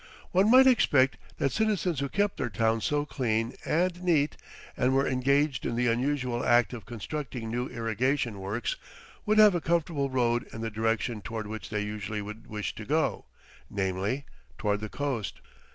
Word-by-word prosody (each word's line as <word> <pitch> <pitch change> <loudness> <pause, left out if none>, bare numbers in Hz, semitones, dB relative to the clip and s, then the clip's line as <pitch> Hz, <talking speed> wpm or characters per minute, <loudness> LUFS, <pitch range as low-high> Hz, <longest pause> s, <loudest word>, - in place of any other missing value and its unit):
One 190 +4 +4
might 260 +2 +8
expect 145 - +4 0.2
that 140 -3 +1
citizens 195 -8 0
who 140 -1 -2
kept 200 +3 0
their 130 -4 -1
town 110 +1 +1
so 145 +5 0
clean 115 -5 -1
and 175 +2 +1
neat 155 -5 +2 0.4
and 130 +1 +2
were 135 +1 +3
engaged 140 +2 +1
in 120 - -2
the 125 +1 +1
unusual 125 0 0
act 120 0 +4
of 115 -3 -8
constructing 120 0 -5
new 120 +2 -1
irrigation 115 0 -1
works 100 +5 -3 0.5
would 215 +1 +3
have 210 -2 +8
a 175 - 0
comfortable 155 -3 0
road 120 -2 +1
in 110 - -7
the 115 -1 -3
direction 115 +1 -1
toward 110 +2 -5
which 110 +1 -6
they 105 -1 -1
usually 105 0 -4
would 105 +2 -9
wish 105 -1 -4
to - - -8
go, - - 0 0.4
namely, 100 +7 -1 0.3
toward 105 -1 0
the 110 0 -5
coast. 135 -7 -3
125 Hz, 170 wpm, -28 LUFS, 110-145 Hz, 0.5 s, might